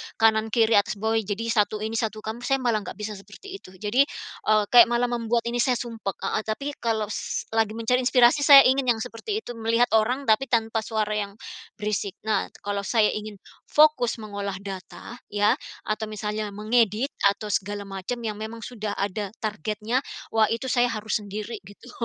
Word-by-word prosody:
kanan, 220 -1 +3
kiri, 225 -2 +4
atas, 205 - +1
bawah, 220 +2 0
jadi 210 +1 -3
satu 215 -1 +1
ini, 220 +1 -2
satu 215 -1 -3
kamu, 220 +2 -5
saya 270 -1 +1
malah 235 -3 +2
nggak - - -7
bisa 210 0 -5
seperti 370 - -11
itu. 185 - -15
Jadi, 215 +8 +2 0.4
eee, 215 -1 +4
kayak 240 -1 +9
malah 240 +1 +1
membuat 235 0 0
ini 240 0 -2
saya 250 +1 +3
sumpek. 225 -5 -4
Heeh. 215 - -2
Tapi, 275 +7 -2
kalau 220 -3 -1
s - - -3
lagi 220 -1 +1
mencari 230 +2 +1
inspirasi, 245 +2 +5
saya 280 -2 +10
ingin 260 0 +2
yang 225 - -7
seperti 405 - -4
itu. - - -7
Melihat 230 +2 +2
orang, 235 +5 +2
tapi 220 +5 +3
tanpa 225 -2 +1
suara 215 -2 -1
yang 205 -1 -2 0.4
berisik. 210 -1 -2 0.2
Nah, 215 - +1 0.2
kalau 200 -1 -3
saya 220 -3 +3
ingin 215 0 -5 0.3
fokus 295 -7 +3
mengolah 200 -2 -4
data, 195 +4 -8
ya, 205 0 +3 0.2
atau 215 +1 -2
misalnya 210 -1 -4
mengedit, 220 +3 +1 0.2
atau 210 +1 -8
segala 205 +1 -2
macam 195 +5 -5
yang 215 -2 -4
memang 220 +2 -7
sudah 215 -2 -5
ada 200 0 -3
targetnya. 215 +2 -2 0.3
Wah, 220 -1 +3
itu 255 +3 -4
saya 245 -1 +3
harus 215 -1 -1
sendiri 210 +3 -6
gitu. 205 +5 -14
220 Hz, 180 wpm, -25 LUFS, 210-240 Hz, 0.4 s, saya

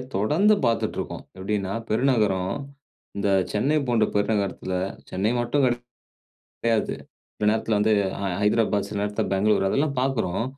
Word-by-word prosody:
தொடர்ந்து 155 - +3
பார்த்துட்டு 115 -1 0
இருக்கோம். - - -5
எப்படீன்னா 100 0 -2 0.2
பெருநகரம் 105 -6 +2 0.6
இந்த 100 0 0 0.2
சென்னை 140 +9 +1
போன்ற 115 -2 +3
பெருநகரத்துல 100 -3 0 0.4
சென்னை 100 +5 0
மட்டும் 120 +4 +1
கிடை 120 -1 +2 0.8
கிடையாது. 115 -2 +1 0.4
சில 105 - +1
நேரத்தில 110 -1 +1
வந்து 110 +1 +3 0.3
அ - - -2 0.2
ஹைதராபாத். 105 -1 +2
சில 105 -1 -3
நேரத்தில 105 0 -1
பெங்களூர் 95 0 +2
அதெல்லா 145 +7 +2
பார்க்குறோம். 115 -7 0
105 Hz, 130 wpm, -24 LUFS, 100-120 Hz, 0.8 s, தொடர்ந்து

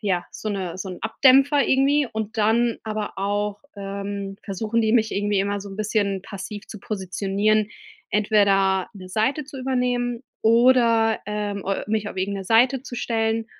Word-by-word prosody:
ja, 185 -4 0
so 215 - -6
'ne 185 -3 -4
so 190 - -5
'n 180 - -8
Abdämpfer 270 +5 +4
irgendwie 275 +1 +3
und 220 0 -4
dann 230 +2 +2
aber 215 -1 -4
auch, 205 +1 -1 0.2
ähm, 200 0 -5
versuchen 220 +3 -1
die 220 0 +1
mich 220 -2 +2
irgendwie 205 0 +1
immer 200 0 -1
so 200 - -8
'n 195 - -9
bisschen 205 -2 -1
passiv 200 +1 -8
zu 210 - -8
positionieren, 205 +2 0 0.4
entweder 195 -2 +2
'ne 185 -2 -10
Seite 225 +10 0
zu 275 -1 -10
übernehmen 250 -2 -1 0.2
oder, 230 -1 +4
ähm, 205 -1 -3
äh 195 - -1
mich 215 -1 -1
auf - - -9
irgend 195 +2 -2
'ne 195 - -6
Seite 245 +5 +3
zu 250 - -8
stellen 225 -1 -1
215 Hz, 170 wpm, -23 LUFS, 200-230 Hz, 0.4 s, Abdämpfer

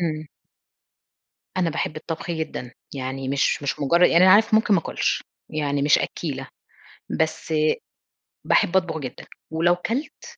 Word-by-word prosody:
امم. 155 -2 -2 1.3
أنا 175 -3 +1
باحب 155 0 -3
الطبخ 165 +3 -5
جدًا، 160 -7 -4 0.2
يعني 130 0 -4
مش 140 +1 +1
مش 140 - -2
مجر 170 +5 +3
يعني 180 0 +6
أنا 185 - +8
عارف 220 +1 +5
ممكن 220 -1 +4
ما 180 - +3
آكلش، - - -1 0.3
يعني 145 -2 -1
مش 145 - +5
أكّيلة، 135 -5 -4 0.7
بس 160 0 -1 0.9
باحب 190 - +3
أطبخ 165 -4 +1
جدًا، 130 -4 -7 0.3
ولو 175 +2 +3
كلت 275 - -4
160 Hz, 140 wpm, -23 LUFS, 140-180 Hz, 1.3 s, أنا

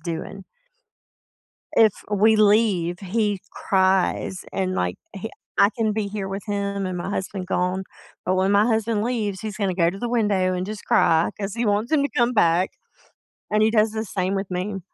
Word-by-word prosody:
doing. 170 +4 -6 1.3
If 220 -3 +5 0.2
we 215 +2 +4
leave, 205 -5 +3
he 205 +1 -1
cries 190 -1 +1
and, 185 -1 -1
like, 90 - -1 0.2
he 200 +3 -6 0.3
I 200 - +6
can 220 -2 +1
be 210 -1 -2
here 200 -1 -4
with 195 +1 -5
him 200 -1 -2
and 185 -1 -3
my 175 - -4
husband 190 -1 -4
gone, 180 +1 -1 0.4
but 185 - +1
when 190 +1 +2
my 205 +1 +5
husband 225 -2 +1
leaves, 220 -5 -2
he's 215 -3 -5
gonna 200 -3 0
go 170 -2 +2
to 195 +3 -8
the 240 - -2
window 205 -6 +1
and 180 0 -2
just 210 0 -7
cry 160 +1 +3
'cause 195 -1 -4
he 235 +1 -1
wants 210 +4 0
him 310 -2 +4
to 280 - +1
come 240 0 +3
back, 180 -4 +3 0.8
and 215 0 +2
he 220 - +4
does 215 -1 +3
the 220 0 -3
same 190 -2 -2
with 195 -1 -3
me. 190 +2 -3
200 Hz, 190 wpm, -23 LUFS, 185-215 Hz, 1.3 s, I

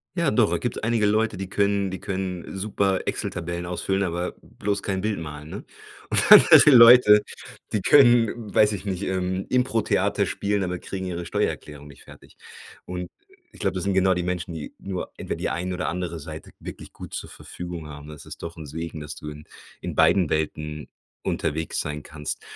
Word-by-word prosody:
Ja, - - +1
doch, - - +2
gibt - - -4
einige 115 -1 +1
Leute, 110 +1 +1
die 95 - -5
können 100 0 0
die 95 - -5
können 95 -2 -4
super 100 -1 0
Excel-Tabellen 85 +1 -4
ausfüllen, 95 +2 -1
aber 85 -1 -2
bloß 100 0 -3
kein 95 -2 -2
Bild 105 -1 -1
malen, 75 -1 -8
ne? - - -8 0.4
Und - - +2
dann - - +12
halt - - +9
die 150 - +8
Leute, 115 -4 +9 0.5
die 105 - 0
können, 120 -5 +6 0.2
weiß 105 0 +5
ich 100 -2 -5
nicht, 95 -1 -3
ähm, 95 0 -2
Impro-Theater 125 -3 +1
spielen, 100 0 -1
aber 90 -1 -3
kriegen 95 +1 -6
ihre 85 -1 -4
Steuererklärung 75 -3 -3
nicht 70 - -15
fertig. - - -16 0.5
Und 90 -1 -5 0.4
ich - - -17
glaube, 95 -2 -1
das 90 - -3
sind 100 -1 0
genau 95 0 +3
die 90 - -2
Menschen, 90 0 -3
die 80 -2 -7
nur 95 -2 -5
entweder - - -4
die - - -2
eine 90 +1 -3
oder 90 - -3
andere 90 -2 -3
Seite 80 +1 -9
wirklich - - -10
gut - - -10
zur - - -5
Verfügung 85 -3 -8
haben. 75 0 -10
Das 75 -1 -11
ist - - -10
doch 85 0 -7
'n 80 - -8
Segen, 80 +2 -6
dass 75 0 -7
du 75 - -8
in 75 0 -10 0.4
in - - -5
beiden 90 -5 +4
Welten 75 -1 -3 0.4
unterwegs 80 +2 -2
sein 75 -1 -5
kannst. 75 -1 -6
90 Hz, 190 wpm, -24 LUFS, 80-100 Hz, 0.5 s, dann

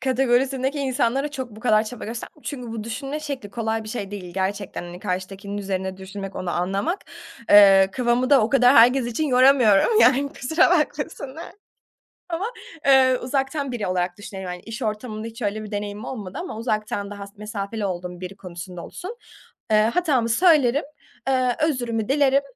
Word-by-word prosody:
kategorisindeki 265 +2 +1
insanlara 265 +1 0
çok 260 -4 -5
bu 215 0 -13
kadar 215 -3 +3
çaba 245 +2 -7
gösterm 230 +1 -6
Çünkü 250 -5 -6
bu 220 -2 -5
düşünme 275 +6 -4
şekli 275 -8 -6
kolay 220 +1 -2
bir - - -8
şey 205 -3 -5
değil. 180 -4 -8
Gerçekten, 195 +1 -3
hani 175 0 -9
karşıdakinin 195 +3 -4
üzerine 190 -1 -3
düşünmek, 195 +1 -8
onu 180 - -3
anlamak. 195 - -1 0.5
Eee, 195 -2 +8
kafamı 250 +3 +1
da 275 - +7
o 220 - 0
kadar 255 0 +5
herkes 245 +2 +6
için 240 +6 -1
yoramıyorum 255 - +5
yani 280 +1 +5
kusura 320 +8 +2
bakmasınlar 300 -2 -2 0.8
ama 335 +4 -2 0.4
eee, 260 -2 +5
uzaktan 270 +2 -2
biri 225 -6 -3
olarak 180 0 -1
düşünüyorum, 190 -3 -7
hani, 180 - -9
iş 225 +1 -8
ortamında 215 0 -4
hiç 230 +2 -11
öyle 215 +1 -2
bir 210 - -9
deneyimim 205 +2 -4
olmadı 205 -8 -6
ama 360 -11 -6
uzaktan 215 -3 -2
daha 200 -1 -7
s 200 - -18
mesafeli 210 0 -4
olduğum 180 -1 -4
biri 185 +1 -6
konusunda 180 -1 -8
olsun, 430 +7 -8 0.5
eee, 215 - +5 0.2
hatamı 275 -10 +1
söylerim, 290 -2 +4 0.4
eee, 255 -2 +2
özrümü 240 -7 -2
dilerim, 275 0 +3
230 Hz, 165 wpm, -23 LUFS, 200-270 Hz, 0.8 s, Eee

